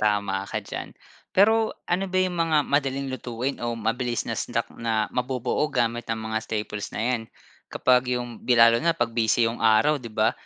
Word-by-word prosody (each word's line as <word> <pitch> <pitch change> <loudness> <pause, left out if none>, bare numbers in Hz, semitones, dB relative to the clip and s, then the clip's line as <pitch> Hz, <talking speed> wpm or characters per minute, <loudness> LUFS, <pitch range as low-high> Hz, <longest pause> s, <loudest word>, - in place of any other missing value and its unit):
Tama 100 -2 0
ka - - -2
diyan. - - -7 0.3
Pero 220 +3 +3
ano 180 +3 0
ba 185 - -2
yung 185 -1 +1
mga 160 -2 +3
madaling 140 -1 0
lutuin 125 +1 -3
o 120 -1 -2
mabilis 120 +2 -1
na - - -2
snack, - - -2
na 110 -2 0
mabubuo 130 +3 -1
gamit 120 0 -1
ang 110 0 -2
mga 110 0 -1
staples 105 -2 -4
na - - -3
'yan. 120 -3 0 0.5
Kapag 125 0 +3
yung 120 -2 -6
bi 125 -2 +2
lalo 115 0 +7
na 170 0 +2
pag 120 -1 0
busy 115 0 +3
yung 115 +1 -3
araw, 115 +8 +4
'di 115 - -7
ba. 110 0 +2
120 Hz, 190 wpm, -25 LUFS, 110-135 Hz, 0.5 s, lalo